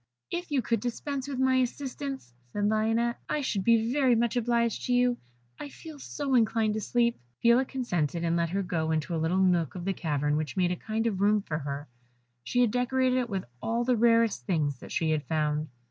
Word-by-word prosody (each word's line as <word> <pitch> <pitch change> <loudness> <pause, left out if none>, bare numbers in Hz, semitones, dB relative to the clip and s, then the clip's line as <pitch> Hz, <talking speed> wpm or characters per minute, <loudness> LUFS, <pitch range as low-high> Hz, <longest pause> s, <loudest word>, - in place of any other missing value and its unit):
"If 350 0 -3
you 275 -4 +1
could 230 0 +1
dispense 265 +4 -4
with 275 -2 -4
my 260 0 +3
assistance," 265 - -3 0.2
said 205 +6 0
Lionette, 225 +2 +1
"I 300 - 0
should 205 -8 -1
be 230 +1 +3
very 265 -4 +4
much 235 +1 +1
obliged 235 -1 0
to 250 - +1
you; 245 0 +3 0.4
I 290 - -6
feel 310 +1 -11
so 280 0 -3
inclined 225 -2 +3
to 220 - -2
sleep." 235 +1 +1 0.2
Phila 235 +3 +5
consented, 175 - -2
and 170 0 +1
let 170 -1 +1
her 195 +3 -1
go 165 -3 -1
into 160 +2 -1
a 160 - -1
little 165 +3 +1
nook 180 -3 +2
of 175 -1 -6
the 195 - 0
cavern 150 -4 0
which 155 +3 -4
made 180 -1 +2
a - - 0
kind 220 +5 -3
of 200 -4 -1
room 205 0 +3
for 150 -4 -3
her. 140 0 -5 0.6
She 245 - +1
had 240 -3 +3
decorated 255 +1 +1
it 245 -2 -1
with 195 -3 -3 0.2
all 230 +1 0
the 250 0 +2
rarest 230 -1 +3
things 150 -8 0
that - - -11
she 160 -1 0
had 155 -1 +1
found. 155 -1 0
225 Hz, 215 wpm, -28 LUFS, 170-245 Hz, 0.6 s, Phila